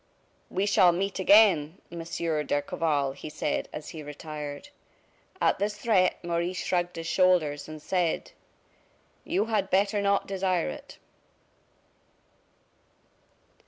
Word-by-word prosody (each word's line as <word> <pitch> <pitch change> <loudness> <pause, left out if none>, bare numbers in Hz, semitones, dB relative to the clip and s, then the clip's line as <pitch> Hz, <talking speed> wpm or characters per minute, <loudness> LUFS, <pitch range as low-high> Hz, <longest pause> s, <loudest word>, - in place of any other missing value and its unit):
"We 190 +2 0
shall 195 -3 +5
meet 195 +3 -2
again, 190 -5 +5
Monsieur 165 -2 -2
d'Escorval," 145 -1 0
he 145 - -9
said, 150 - -2
as 150 - -7
he 160 - -8
retired. 150 - -7 0.7
At - - +2
this 210 +1 -1
threat, 200 -4 +2
Maurice 170 +1 -2
shrugged 175 -1 0
his 165 - -6
shoulders, 165 -4 +2
and 155 0 -8
said: 175 +1 -1 0.9
"You 200 +4 0
had 210 -4 0
better 200 +2 +2
not 200 0 +2
desire 185 - 0
it." 75 - -9
175 Hz, 115 wpm, -27 LUFS, 155-195 Hz, 0.9 s, shall